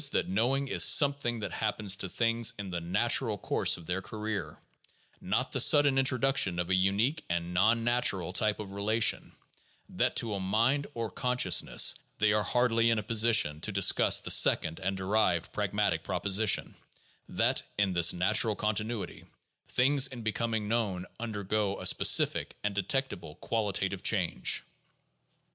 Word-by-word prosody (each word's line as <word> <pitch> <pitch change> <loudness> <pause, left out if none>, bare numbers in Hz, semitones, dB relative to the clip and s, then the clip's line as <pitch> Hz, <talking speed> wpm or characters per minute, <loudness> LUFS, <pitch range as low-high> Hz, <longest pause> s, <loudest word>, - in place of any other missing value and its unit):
that - - 0
knowing 125 +8 -1
is - - +2
some 145 -2 +6
thing 120 -5 -5
that - - -5
happens 100 -3 -1
to 95 - -4
things 115 +2 0
in 100 -2 -7
the 85 -1 -4
natural 105 +5 0
course - - +1
of 85 - -14
their 90 +3 -3
career, 110 +1 -6 0.6
not - - -2
the - - -2
sudden 145 -2 +5
introduction 130 -7 +1
of 90 +1 -3
a - - +2
"unique" 100 +11 0
and 85 0 -3
non 110 +6 +2
natural 115 -7 0
type 105 +1 +1
of 100 -2 -8
relation 110 +3 0 0.3
— - - -36
that - - +1
to 110 -2 0
a 100 - -4
mind 115 +9 0
or 115 -3 -5
consciousness 125 +4 +2
— - - -34
they 105 -1 +1
are 105 - +1
hardly 115 +1 +1
in 115 - +1
a 105 - -3
position 110 -9 +1
to 110 - -4
discuss 100 -1 +4
the - - -1
second 80 +2 +3
and 95 0 -3
derived 95 -3 -1
pragmatic - - -2
proposition 100 +1 0 0.6
that, - - 0 0.2
in 100 -2 0
this 85 0 +4
natural 105 +4 +1
continuity, 105 +1 -4 0.4
things 135 +2 +2
in 125 -4 -10
becoming 110 0 -3
known 105 -5 -2
undergo 105 -2 -3
a - - -8
specific - - +2
and 105 -1 -2
detectable 100 - -4
qualitative 105 +1 -3
change. - - +1
105 Hz, 155 wpm, -28 LUFS, 95-115 Hz, 0.6 s, some